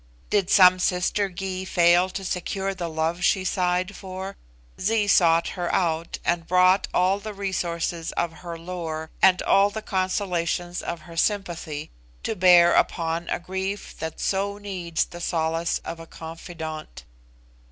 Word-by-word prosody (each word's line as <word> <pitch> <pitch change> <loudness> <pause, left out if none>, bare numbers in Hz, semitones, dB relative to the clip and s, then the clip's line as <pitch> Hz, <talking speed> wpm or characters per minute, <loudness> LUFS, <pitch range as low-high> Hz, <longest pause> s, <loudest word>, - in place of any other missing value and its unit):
Did 200 -3 +2
some 185 -2 +7
sister 180 +3 +1
Gy 190 0 -4
fail 175 0 +4
to 195 +1 -6
secure 190 +2 -2
the 175 -3 -4
love 160 +2 -1
she 190 - +3
sighed 180 +1 0
for? 190 0 -7 0.4
Zee 215 +1 +2
sought 170 -4 +4
her 175 -2 -3
out, 165 -2 0
and 170 -1 0
brought 185 +2 +4
all 185 +2 +2
the 215 0 -7
resources 170 -4 -2
of 170 -1 -1
her 170 -1 -6
lore, 165 -2 -5
and 185 -1 +5
all 200 +1 +4
the 215 +1 -6
consolations 180 -2 -1
of 170 -1 -5
her 170 0 -12
sympathy, 170 -6 -2 0.3
to 225 - -2
bear 175 -2 +6
upon 165 0 0
a - - 0
grief 190 +3 -5
that 160 -1 -5
so 200 +1 -1
needs 185 -5 -2
the 175 - -10
solace 165 0 0
of 170 - -6
a 165 - -10
confidant. 160 - -8
180 Hz, 150 wpm, -25 LUFS, 170-190 Hz, 0.4 s, some